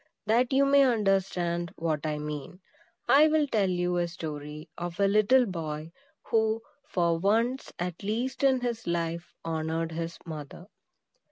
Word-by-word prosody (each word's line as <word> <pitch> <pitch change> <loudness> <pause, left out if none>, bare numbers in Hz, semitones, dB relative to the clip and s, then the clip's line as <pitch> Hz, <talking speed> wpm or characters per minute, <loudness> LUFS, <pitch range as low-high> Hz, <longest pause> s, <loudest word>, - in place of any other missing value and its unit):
That 235 +4 +2
you 275 +1 +4
may 280 0 +5
understand 195 -8 +1
what 155 -2 -1
I 150 -1 -1
mean, 150 +3 -6 0.5
I 295 +3 +7
will 310 -1 +3
tell 210 -8 +1
you 180 0 0
a 175 0 +1
story 150 -2 -7
of 175 +1 -6
a 200 - +4
little 215 +6 +4
boy 160 -4 -5 0.3
who, 220 0 +1 0.3
for 170 - +1
once, 230 +7 +1
at 175 -1 -4
least 235 +7 -2
in 265 -2 +4
his 235 -4 -3
life, 170 0 -2
honored 160 0 -2
his 165 +1 -4
mother. 155 +1 -8
175 Hz, 150 wpm, -28 LUFS, 165-225 Hz, 0.5 s, I